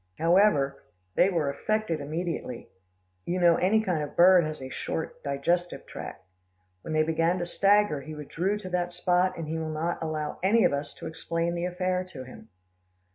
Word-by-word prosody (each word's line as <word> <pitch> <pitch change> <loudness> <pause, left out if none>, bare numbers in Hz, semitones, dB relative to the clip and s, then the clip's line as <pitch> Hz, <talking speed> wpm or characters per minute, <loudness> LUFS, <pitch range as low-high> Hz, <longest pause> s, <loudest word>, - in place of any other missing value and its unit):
"However, 165 -6 +3 0.3
they 190 - +4
were 160 -7 0
affected 215 +1 -1
immediately. 155 -4 -4 0.5
You 180 - -2
know 170 -2 +5
any 210 +5 +3
kind 180 -7 0
of 145 - -3
a - - -19
bird 180 0 +7
has 155 0 -5
a 130 -1 -7
short 160 - -4
digestive 170 +6 -1
tract. 95 - -9 0.6
When - - -7
they 155 0 +3
began 165 +3 +1
to 175 - -2
stagger, 200 -4 +3
he 155 +2 -8
withdrew 170 +7 -2
to 190 -3 -8
that 175 -1 -1
spot, 180 +1 +2
and 165 -2 -5
he 160 +1 -2
will 160 -1 -3
not 160 +3 -2
allow 155 -2 -3
any 215 +5 +4
of - - +3
us 140 +1 -4
to - - -10
explain 165 +1 -2
the 175 0 -2
affair 180 0 -1
to 130 -4 -7
him." 125 -3 -13
170 Hz, 185 wpm, -27 LUFS, 155-180 Hz, 0.6 s, bird